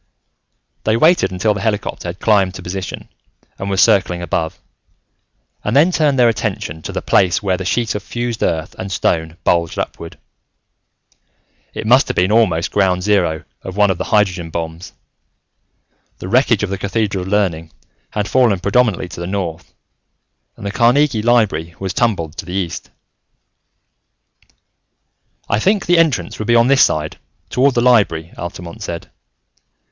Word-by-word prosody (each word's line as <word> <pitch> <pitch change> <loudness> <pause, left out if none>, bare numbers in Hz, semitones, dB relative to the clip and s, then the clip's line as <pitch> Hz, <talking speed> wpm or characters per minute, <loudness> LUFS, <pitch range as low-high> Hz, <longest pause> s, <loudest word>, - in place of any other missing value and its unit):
They 110 +1 +2
waited 165 - +4
until 100 +4 +1
the 100 - -5
helicopter 105 -4 -2
had 85 +2 -6
climbed 100 -4 +2
to - - -8
position 95 +1 -6 0.5
and 100 - -4
was 95 0 +2
circling 90 -3 +2
above, 80 -2 -2 1.0
and 105 - -1
then 155 +6 +5
turned 150 -5 +2
their 125 -1 +5
attention 105 -7 -2
to - - -6
the - - -4
place 95 +1 +2
where 95 -2 +1
the 95 +1 -6
sheet 115 +3 0
of 105 - -4
fused 120 +2 -4
earth 80 0 -1
and 95 +1 -5
stone 80 -2 -1
bulged 85 -1 +1
upward. 85 - -5 1.6
It - - -5
must 125 +4 +5
have - - -3
been 90 +3 +2
almost 100 -8 +2
ground 95 -3 +1
zero 90 -6 +1 0.2
of 95 +1 -8
one 105 -1 +4
of 90 - -4
the - - -2
hydrogen 95 -5 +1
bombs: 80 +1 -6 1.2
the - - -7
wreckage 115 -1 +2
of 100 - -2
the 100 - -3
Cathedral 100 -1 -1
of 90 - -6
Learning 90 -6 0 0.4
had 105 -1 -2
fallen 120 -7 +3
predominantly 100 -1 +1
to 85 - -9
the 85 - -4
north, 90 -4 -4 0.9
and - - -9
the 100 - -2
Carnegie 120 +1 +3
Library 105 -9 +1
was 95 -1 -4
tumbled 85 -10 -1
to - - -5
the 90 - -6
east. 90 -3 -4 2.6
"I 105 - +1
think 200 - +1
the 175 -1 +4
entrance 130 - +1
would 110 - -4
be 120 - +4
on 120 +2 +4
this 140 0 +6
side, 75 0 -1 0.3
toward 135 +1 +2
the 120 - +2
Library," 100 -10 +2
Altamont 85 0 -8
said. 85 -1 -6
100 Hz, 160 wpm, -17 LUFS, 85-115 Hz, 2.6 s, this